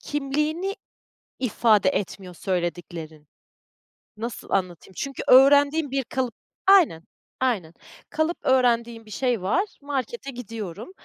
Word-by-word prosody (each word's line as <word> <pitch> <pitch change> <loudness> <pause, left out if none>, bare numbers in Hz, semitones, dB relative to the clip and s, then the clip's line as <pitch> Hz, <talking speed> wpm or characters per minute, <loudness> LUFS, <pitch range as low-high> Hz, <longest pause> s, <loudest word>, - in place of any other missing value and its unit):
kimliğini 300 - -2 0.6
ifade 220 -5 +3
etmiyor 190 -1 -3
söylediklerin. 170 -4 -4 0.9
Nasıl 230 +1 -6
anlatayım? 185 -1 -2
Çünkü 275 -2 -4
öğrendiğin 285 +3 +6
bir 270 -1 0
kalıp, 250 -2 -3 0.3
aynen, 340 - +5 0.4
aynen, 205 -11 0 0.4
kalıp 315 +2 0
öğrendiğin 235 -3 +2
bir 215 - -14
şey 245 -3 0
var, 235 - +2 0.2
markete 280 - -4
gidiyorum, 225 - -7
240 Hz, 105 wpm, -24 LUFS, 190-280 Hz, 0.9 s, öğrendiğin